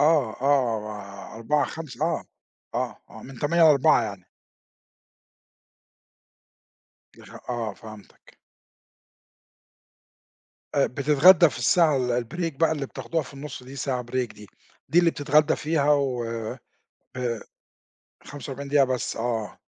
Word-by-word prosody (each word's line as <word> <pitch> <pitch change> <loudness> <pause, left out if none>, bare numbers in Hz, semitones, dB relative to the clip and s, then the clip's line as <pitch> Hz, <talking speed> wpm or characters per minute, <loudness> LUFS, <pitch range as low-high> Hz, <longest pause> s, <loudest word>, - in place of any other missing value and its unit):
آه 150 -5 +4
آه 110 -7 -1
16:00 130 +6 +1
17:00 155 -2 -5
آه 170 - -1 0.5
آه - - -2
آه - - -12
من 135 -2 -11
08:00 170 +5 +2
ل16:00 155 -3 +5
يعني. 100 -4 -6 2.9
يفه - - -13
آه 115 -4 -2
فهمتك. 110 0 -15 2.4
آآ، 140 - +4
بتتغدى 150 +6 +5
في - - -8
الساعة 160 -5 +4
ال 125 -1 0
الbreak 165 +5 -3
بقى 165 +1 +3
اللي 145 -3 -2
بتاخدوها 135 +5 -3
في 140 - -13
النُصّ 140 -2 -8
دي، 130 +2 -11
ساعة 130 -2 -2
break 125 +1 -2
دي 105 -1 -13 0.4
دي 170 +5 +5
اللي 170 -1 +3
بتتغدى 150 +1 +2
فيها 150 -2 +1
وآآ، 120 -6 -1 1.6
45 140 0 -8
دقيقة 145 -1 +5
بس، 130 -1 -2
آه، 115 -2 -3
135 Hz, 115 wpm, -25 LUFS, 120-150 Hz, 2.9 s, ل16:00